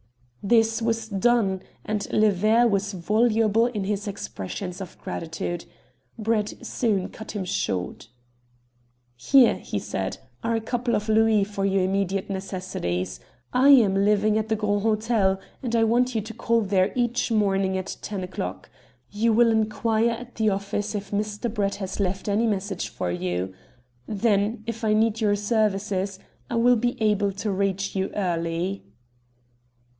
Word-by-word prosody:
This 225 +2 +3
was 225 -1 -1
done, 200 -2 +2 0.2
and 210 -1 -3
"Le 215 0 +4
Ver" 215 +5 +3
was 200 -2 +1
voluble 220 +4 +2
in 215 -5 -3
his 205 +1 -2
expressions 185 - -5
of 190 - -8
gratitude. 165 +1 -5 0.5
Brett 215 -1 -1
soon 205 -6 0
cut 220 - -9
him 200 -3 -3
short. 95 - -2 1.1
"Here," 255 - +5
he - - -4
said, 95 -1 -3 0.3
"are 230 - +1
a - - +1
couple 240 +2 -1
of 210 +1 -2
louis 220 -1 +4
for 200 -1 -4
your 195 -1 +2
immediate 195 +1 -1
necessities. 180 - -3 0.3
I 260 +3 +5
am 235 -9 +7
living 210 +2 +3
at 220 0 -3
the 220 - +2
Grand 205 -1 0
Hotel, 215 -3 +1 0.2
and 240 -3 -2
I 225 - +4
want 240 +2 +2
you 220 - +1
to 220 +2 -8
call 230 +1 +1
there 195 -1 +2
each 245 -1 0
morning 195 -3 +2
at 185 - -5
ten 200 -3 -4
o'clock. 130 - -5 0.4
You 225 +3 +2
will 230 +1 +5
inquire 220 +1 +1
at 240 +1 -6
the 220 -1 +1
office 205 +2 -2
if 200 -1 -5
Mr. 210 +2 -2
Brett 200 -3 0
has 190 -1 -5
left 190 0 -1
any 210 +3 +2
message 200 -1 -2
for 90 - -3
you. 90 +1 -2 0.5
Then, 210 +1 +1
if 230 0 -5
I 215 -1 +3
need 225 +1 +2
your 205 -2 +3
services, 205 -2 0 0.3
I 240 - -2
will 240 +1 +4
be 240 +2 -1
able 210 -2 +2
to 205 +2 -3
reach 195 0 -1
you 190 0 0
early." 175 0 -1
210 Hz, 155 wpm, -25 LUFS, 195-225 Hz, 1.1 s, am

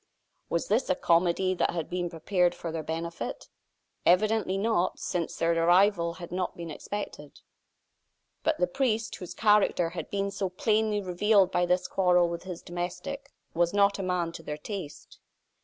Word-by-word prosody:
Was 170 - -1
this 230 +6 +1
a 185 - +3
comedy 175 +2 +2
that 185 - +1
had 165 -3 -3
been 175 -1 -2
prepared 175 +2 +1
for 165 - -5
their 160 0 -3
benefit? 165 +2 -5 0.6
Evidently 210 +2 +3
not, 200 -3 +1
since 170 -2 -3
their 165 0 +1
arrival 170 +1 +3
had 175 -2 -9
not 180 0 -3
been 170 -2 -6
expected. 150 -4 -7 1.0
But - - +1
the 180 - +3
priest, 225 +2 -1
whose 180 - -8
character 210 -5 +3
had 175 - -6
been 200 0 -1
so 195 -1 -2
plainly 215 +2 +1
revealed 190 +1 +3
by 175 -1 +1
this 180 +1 +1
quarrel 180 -2 +3
with 170 0 -4
his 180 -2 -7
domestic, 175 +10 -5 0.2
was 175 +3 +1
not 200 0 +3
a - - -1
man 180 -3 -1
to 165 - -9
their 150 -2 -5
taste. 180 -1 -8
180 Hz, 165 wpm, -28 LUFS, 170-200 Hz, 1.0 s, a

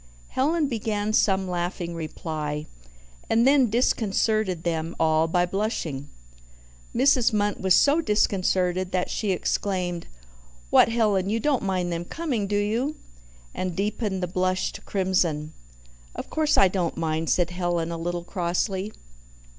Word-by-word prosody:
Helen 305 +3 +1
began 215 -3 -2
some 190 -3 +2
laughing 175 -1 -3
reply, 155 -2 -4 0.6
and 230 +2 +3
then 270 -3 +5
disconcerted 215 -5 +1
them 165 -1 -2
all 160 0 +3
by 175 +2 +2
blushing. 175 - -3 0.9
Mrs. 255 -1 +4
Munt 205 -1 0
was 190 -1 +4
so 290 +4 +4
disconcerted 185 - +1
that 180 -1 0
she 210 - -2
exclaimed, 180 -2 -1 0.6
"What, - - +6
Helen, 210 -5 +1
you 225 +2 0
don't 270 +2 +1
mind 185 -3 -1
them 170 +1 -3
coming, 255 - -2
do 205 +1 0
you?" 230 +9 0 0.6
and 185 -2 -3
deepened 200 -1 -2
the - - 0
blush 185 +1 0
to - - -10
crimson. 175 -6 0 0.6
"Of - - -7
course 310 -1 +2
I 195 - +7
don't 180 -3 -2
mind," 160 0 -1
said 175 -1 +2
Helen 175 -2 -1
a 170 - -3
little 175 +1 -3
crossly. 185 +3 -2
185 Hz, 140 wpm, -25 LUFS, 175-215 Hz, 0.9 s, I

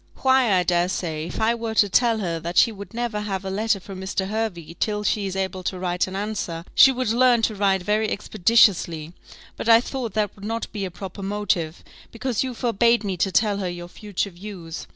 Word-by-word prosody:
"Why, 260 -3 +4
I 180 - +3
dare 175 0 +1
say, 160 -4 -3
if - - -6
I 225 +1 +3
were 230 -1 -4
to 205 - +5
tell 230 +3 +3
her 170 -6 -2
that 170 +2 -5
she 230 - +6
would 200 -3 -10
never 235 -2 -2
have 195 -2 -4
a 190 - -3
letter 210 +1 0
from 190 0 -9
Mr. 190 0 -2
Hervey 195 -7 -3
till 210 -1 -1
she 205 -1 0
is 190 - -5
able 190 -1 -2
to 185 - -2
write 180 0 -1
an 185 - -7
answer, 195 -5 -4
she 270 - +8
would 255 -3 -2
learn 240 -1 +4
to 220 - +2
write 195 -2 +1
very 210 +2 +1
expeditiously; 185 -6 +2 0.4
but - - -3
I 230 0 +8
thought 245 -3 -5
that 210 -2 0
would 200 - -14
not 225 +1 -3
be 200 -3 -3
a - - -4
proper 190 +2 -8
motive, 195 -5 -2 0.3
because 235 0 -2
you 255 -2 -4
forbade 235 0 +2
me 195 -2 -2
to 190 +3 +1
tell 205 +2 +2
her 185 -2 -2
your 175 0 -7
future 200 +1 -4
views. 175 -3 -8
200 Hz, 220 wpm, -23 LUFS, 180-225 Hz, 0.4 s, she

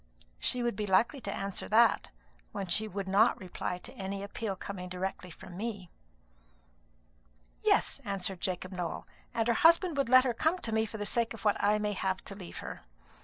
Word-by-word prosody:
She 250 -1 +1
would 240 -3 0
be 210 0 -2
likely 235 +9 +3
to 200 - -4
answer 195 -1 -3
that, 230 +1 +4 0.4
when 195 - -3
she 210 +5 +2
would 200 -1 -4
not 205 +5 +4
reply 180 -1 -4
to - - -10
any 195 0 -4
appeal 200 0 -4
coming 185 -1 -6
directly 180 0 -4
from 180 +1 -11
me." 200 -3 -5 1.7
"Yes," - - +2
answered 190 -2 -2
Jacob 185 0 -2
Nowell; 180 -3 -4 0.2
"and 225 0 0
her 235 - +4
husband 335 - +5
would 275 -3 +1
let 255 0 +8
her 250 -2 +1
come 320 +9 +1
to 235 - -4
me 220 0 +1
for 220 - -7
the 205 - -3
sake 230 +2 0
of 220 - -12
what 205 - +2
I 210 +1 +4
may 210 0 -1
have 190 -1 -2
to - - -7
leave 190 -3 -9
her. - - -7
200 Hz, 195 wpm, -31 LUFS, 190-230 Hz, 1.7 s, let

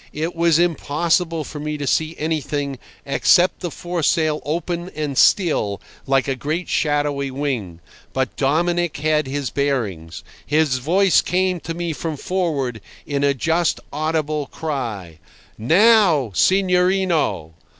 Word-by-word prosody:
It 160 +3 -3
was 165 -1 +3
impossible 165 0 0
for 150 +1 -8
me 150 0 -3
to 145 - -4
see 160 +3 0
anything 145 -3 -2 0.3
except 175 +5 +3
the 175 - -4
foresail 165 -2 0
open 170 +4 -3
and 150 -3 -3
still, 130 - +3 0.3
like 135 0 +2
a 135 - 0
great 155 +7 -3
shadowy 145 -2 0
wing. 125 - -4 0.3
But 130 -1 -2
Dominic 170 +4 0
had 150 0 +1
his 140 -2 -3
bearings. 100 - -2 0.2
His 150 -3 +1
voice 185 +8 +3
came 185 0 0
to 165 0 -6
me 170 -1 -3
from 155 0 -4
forward, 140 - -2 0.2
in 140 -1 -2
a 140 -1 +2
just 165 +4 0
audible 155 -1 -1
cry: 115 - -5 0.4
"Now, 170 - +4
signorino!" 180 - +2
155 Hz, 130 wpm, -21 LUFS, 135-170 Hz, 0.4 s, Now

